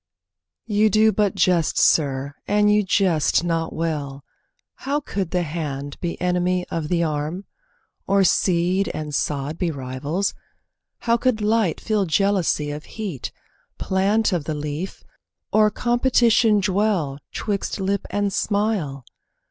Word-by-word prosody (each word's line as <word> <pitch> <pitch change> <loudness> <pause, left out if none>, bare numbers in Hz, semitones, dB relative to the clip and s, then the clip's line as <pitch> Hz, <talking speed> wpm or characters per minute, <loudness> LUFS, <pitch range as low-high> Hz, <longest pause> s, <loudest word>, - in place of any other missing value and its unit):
You 215 +1 +3
do 215 +2 +4
but 205 -1 +1
jest, 175 -3 +2
sir, 140 -2 +2
and 210 0 +3
you 210 - +4
jest 185 -5 +2
not 165 -1 -1
well, 145 -4 -3 0.5
How 285 +2 -1
could 195 - -3
the 180 0 0
hand 145 -3 -5
be 170 -1 -4
enemy 180 0 0
of 165 -2 -2
the 170 +1 +1
arm, 155 +4 -3 0.6
Or 200 0 +4
seed 180 +1 +2
and 150 -1 -5
sod 145 +2 -2
be 180 - 0
rivals! 140 +6 -3 0.7
How 235 0 +2
could 245 -2 +1
light 215 -4 +1
Feel 210 -4 0
jealousy 170 -4 +1
of 150 +1 -7
heat, 195 - -5 0.5
plant 200 +3 +1
of 165 -5 -1
the 155 - -2
leaf, 150 +5 -5 0.5
Or 215 0 +5
competition 240 -2 +3
dwell 190 -8 0
'twixt 205 -1 -3
lip 195 +1 -1
and 205 -1 -1
smile? 200 - -1
185 Hz, 130 wpm, -22 LUFS, 155-210 Hz, 0.7 s, Or